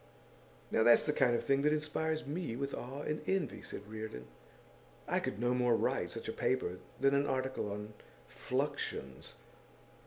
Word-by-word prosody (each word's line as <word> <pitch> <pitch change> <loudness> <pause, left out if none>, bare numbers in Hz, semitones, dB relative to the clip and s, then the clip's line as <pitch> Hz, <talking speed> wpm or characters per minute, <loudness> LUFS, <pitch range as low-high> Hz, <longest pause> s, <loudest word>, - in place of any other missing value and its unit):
'Now - - +3
that's 120 +1 +7
the 150 - +1
kind 120 -4 +4
of - - -1
thing 135 0 +3
that 150 +1 +4
inspires 155 +1 0
me 150 -4 -3
with 140 +2 -3
awe 135 +4 -5
and 150 0 -2
envy,' 190 -8 0
said 100 - -8
Reardon. 110 - -6 0.8
'I - - +2
could 100 - -3
no 120 +1 +2
more 125 -1 +3
write - - +1
such - - -5
a - - -2
paper 90 -8 0 0.2
than 135 0 +4
an 140 +1 +3
article 130 -5 -1
on 105 +1 -5 0.3
Fluxions. 130 - -3
130 Hz, 165 wpm, -34 LUFS, 110-145 Hz, 0.8 s, that's